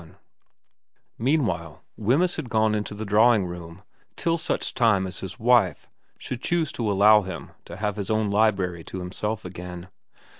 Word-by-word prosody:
XXI 80 -1 -17 1.0
MEANWHILE 115 - -1
Wemyss 140 - +1
had 125 - -5
gone 110 -1 +2
into 105 -1 -3
the 110 +1 -5
drawing 105 0 +4
room 85 +1 -8 0.3
till 165 0 0
such 170 +1 -2
time 110 -6 +3
as 95 - -6
his 95 - -7
wife 115 -8 +2 0.3
should 125 -1 -6
choose 165 -2 0
to 110 -3 -1
allow 105 +2 +6
him 95 -4 -7
to 85 - -9
have 105 0 -2
his 100 -2 -4
own 110 -2 +1
library 95 -5 +1
to - - -7
himself 105 +4 -4
again. 90 0 -8
105 Hz, 160 wpm, -25 LUFS, 90-115 Hz, 1.0 s, allow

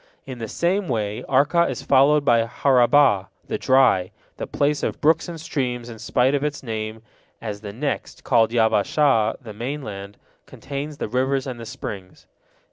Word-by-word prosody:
In 130 -3 -8
the 115 - -4
same 180 - 0
way 105 -4 -2
Arka 150 +6 +3
is 135 +1 -5
followed 140 +2 +4
by 115 -3 +3
Harabah, 125 -5 +3 0.2
the - - -4
dry, 125 -9 +3 0.3
the - - -5
place 145 +1 0
of - - -3
brooks 160 +3 +2
and 165 -1 -7
streams 125 -6 -3
in 115 -2 -10
spite 125 +3 +1
of 140 0 0
its 150 -2 -3
name, 110 -1 -5 0.4
as 105 -2 -6
the 105 -2 -7
next, 140 +7 -4
called 115 -3 +3
Yabbashah, 115 +1 +2
the 110 -4 -9
mainland, 105 -5 -6 0.3
contains 145 +2 -6
the - - -3
rivers 130 +3 0
and 125 -3 -6
the 115 - -8
springs. 95 -4 -8
125 Hz, 165 wpm, -22 LUFS, 110-145 Hz, 0.4 s, followed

